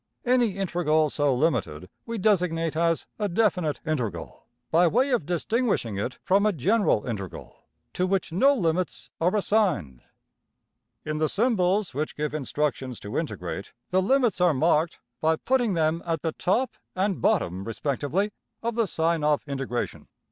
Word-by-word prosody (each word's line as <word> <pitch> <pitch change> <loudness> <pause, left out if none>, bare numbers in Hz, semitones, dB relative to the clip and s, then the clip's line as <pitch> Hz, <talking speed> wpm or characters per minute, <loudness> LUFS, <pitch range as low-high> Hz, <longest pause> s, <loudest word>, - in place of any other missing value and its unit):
Any 245 -5 +3
integral 160 -5 +1
so 145 -1 +2
limited 115 - 0 0.2
we 230 0 -3
designate 175 -6 +1
as 165 0 +1
a 205 -1 0
\emph{definite 180 -6 +1
integral}, 115 - -4 0.2
by 170 +2 +5
way 255 - +2
of 230 - 0
distinguishing 180 - 0
it 125 +5 -3
from 195 +1 +3
a 215 - +4
\emph{general 190 - +1
integral} 100 -6 -6 0.4
to 185 - 0
which 190 -2 0
no 270 - +4
limits 180 -4 -1
are 180 +5 +2
assigned. 180 - +1 1.0
In 155 0 -2
the 155 -1 +2
symbols 200 - +1
which 150 +4 -3
give 150 0 -2
instructions 135 -3 -2
to 105 +4 -7
integrate, 100 - -4 0.2
the 185 +1 +3
limits 235 -2 +2
are 175 -4 +4
marked 160 +3 +2 0.2
by 160 +2 +2
putting 245 +1 +1
them 160 +1 +1
at 165 -3 -2
the 160 - 0
top 230 +10 0 0.2
and 190 0 0
bottom 95 - +1
respectively 145 - -1 0.3
of 235 +1 -1
the 230 -1 +1
sign 165 -1 0
of 150 -1 +2
integration. 135 -3 -3
165 Hz, 150 wpm, -26 LUFS, 145-200 Hz, 1.0 s, by